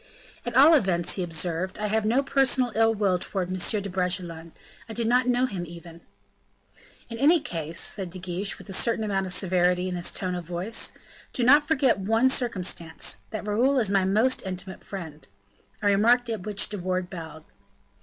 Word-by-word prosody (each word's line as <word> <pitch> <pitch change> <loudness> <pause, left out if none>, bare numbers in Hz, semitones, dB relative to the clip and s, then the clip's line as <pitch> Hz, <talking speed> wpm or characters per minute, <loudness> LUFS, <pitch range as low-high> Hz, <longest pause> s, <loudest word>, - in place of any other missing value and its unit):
"At 240 - -3
all 295 +5 +8
events," 180 - +2
he 190 - -2
observed, 175 +2 -2
"I 210 - -3
have 215 +1 0
no 250 +5 +2
personal 265 -2 +2
ill 225 0 +3
will 195 -4 +1
towards 185 -1 -3 0.2
M. 210 - 0
de - - -4
Bragelonne; 175 -3 -3 0.4
I - - -5
do 235 - -2
not 250 +2 +2
know 250 +1 +2
him 190 -8 -4
even." 170 0 -12 1.1
"In 230 - -6
any 315 +6 +5
case," 165 - -3
said 190 -4 +1
De 180 - -9
Guiche, 185 +2 -5
with - - -13
a 195 - -6
certain 225 +2 0
amount 195 -2 -1
of 180 - -2
severity 180 -1 +2
in 180 - -3
his 175 0 -1
tone 185 -1 -3
of 175 -1 -4
voice, 180 +6 -3 0.4
"do 250 - -1
not 290 +4 +6
forget 270 -8 +2
one 225 +6 +2
circumstance, 185 -10 -2
that 215 -2 -6
Raoul 245 +7 +2
is 220 -6 +1
my 195 -1 +3
most 220 +7 +2
intimate 190 0 -6
friend;" 160 -6 -8 0.6
a - - +2
remark 235 +5 +3
at 215 -3 -5
which 205 -1 +2
De 205 -1 -4
Wardes 185 0 -2
bowed. 160 -3 -8
195 Hz, 190 wpm, -26 LUFS, 180-230 Hz, 1.1 s, all